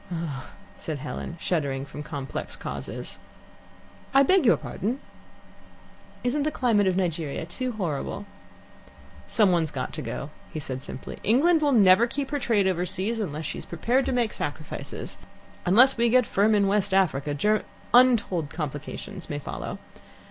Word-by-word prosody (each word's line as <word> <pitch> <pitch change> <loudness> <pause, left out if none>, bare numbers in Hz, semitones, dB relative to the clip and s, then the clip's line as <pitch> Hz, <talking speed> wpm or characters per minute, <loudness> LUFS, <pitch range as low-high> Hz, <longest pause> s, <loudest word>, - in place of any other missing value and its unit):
"Ugh 160 -6 -4 0.2
" - - -23
said 155 -2 -4
Helen, 135 +5 -6
shuddering 140 -7 -1
from 145 - -8
complex 140 -3 -5
causes. - - -6 1.0
"I 275 - +8
beg 370 -1 +4
your - - +6
pardon?" 235 +7 -3 1.2
"Isn't 250 +4 +1
the 300 - +1
climate 230 -8 +2
of 185 -1 +2
Nigeria 165 -5 -1
too 250 +9 -3
horrible?" 190 0 -3 1.0
"Someone's 175 -7 +3
got 130 -3 -4
to - - -4
go," 135 +5 -5 0.2
he 155 - -4
said 130 -3 -5
simply. 135 - -8
"England 310 - +4
will 295 -1 +3
never 210 -1 +6
keep 275 +3 -4
her 290 - 0
trade 220 -6 +2
overseas 185 +5 0
unless 155 -6 -3
she - - -4
is - - -9
prepared 240 +10 +1
to - - +1
make 240 -4 +1
sacrifices. 150 +1 -5 0.5
Unless 245 +9 +6
we 235 0 +3
get 250 +1 +5
firm 210 +2 +3
in 200 -1 +4
West 200 -1 +2
Africa, 150 -6 +2
Ger 210 +8 +2 0.3
untold 230 - +4
complications 150 +3 -6
may 145 - -2
follow. 145 - -5
190 Hz, 155 wpm, -26 LUFS, 155-235 Hz, 1.2 s, I